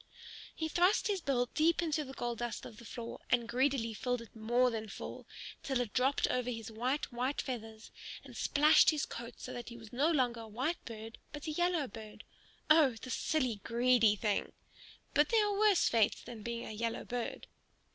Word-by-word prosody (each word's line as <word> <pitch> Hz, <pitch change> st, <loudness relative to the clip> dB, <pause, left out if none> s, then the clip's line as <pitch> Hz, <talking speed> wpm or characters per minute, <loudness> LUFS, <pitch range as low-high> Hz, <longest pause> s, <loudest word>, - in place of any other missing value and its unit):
He 320 Hz, -, -2 dB
thrust 355 Hz, +5 st, +3 dB
his 395 Hz, -3 st, 0 dB
bill 255 Hz, -5 st, +1 dB
deep 325 Hz, +2 st, +3 dB
into 315 Hz, -3 st, 0 dB
the 265 Hz, -1 st, -9 dB
gold 240 Hz, -1 st, -3 dB
dust 240 Hz, -1 st, -4 dB
of 215 Hz, -, -10 dB
the 235 Hz, -, -12 dB
floor, 235 Hz, +1 st, -7 dB
and 240 Hz, -2 st, +2 dB
greedily 250 Hz, -2 st, +1 dB
filled 245 Hz, +2 st, -2 dB
it 230 Hz, -, -18 dB
more 240 Hz, +3 st, +2 dB
than 220 Hz, -1 st, -4 dB
full, -, -, -8 dB, 0.3 s
till 265 Hz, -2 st, -1 dB
it 240 Hz, -4 st, -2 dB
dropped 265 Hz, +2 st, +2 dB
over 250 Hz, -1 st, 0 dB
his 225 Hz, -1 st, -5 dB
white, 255 Hz, +6 st, -1 dB
white 255 Hz, +4 st, -1 dB
feathers 225 Hz, -4 st, -5 dB, 0.3 s
and -, -, -12 dB
splashed 300 Hz, +2 st, +5 dB
his 305 Hz, -2 st, +1 dB
coat 235 Hz, 0 st, -7 dB
so -, -, -7 dB
that 240 Hz, -1 st, -6 dB
he 235 Hz, -, -9 dB
was 225 Hz, -1 st, -13 dB
no 280 Hz, +6 st, +3 dB
longer 250 Hz, -7 st, +1 dB
a 225 Hz, -, -8 dB
white 260 Hz, +10 st, -2 dB
bird 225 Hz, 0 st, -8 dB
but 295 Hz, -1 st, -7 dB
a 310 Hz, -, -2 dB
yellow 345 Hz, -2 st, +1 dB
bird. 215 Hz, 0 st, -10 dB, 0.4 s
Oh, 305 Hz, -6 st, +6 dB
the 255 Hz, -, -7 dB
silly, 255 Hz, -4 st, 0 dB
greedy 235 Hz, -2 st, +4 dB
thing! 210 Hz, 0 st, -1 dB, 0.6 s
But 295 Hz, +1 st, +4 dB
there 445 Hz, -2 st, +4 dB
are 410 Hz, -, 0 dB
worse 420 Hz, -4 st, +5 dB
fates 225 Hz, -3 st, +2 dB
than 230 Hz, -3 st, -9 dB
being 235 Hz, +2 st, -4 dB
a -, -, -6 dB
yellow 230 Hz, +2 st, -3 dB
bird. 245 Hz, -1 st, -4 dB
245 Hz, 195 wpm, -33 LUFS, 230-290 Hz, 0.6 s, Oh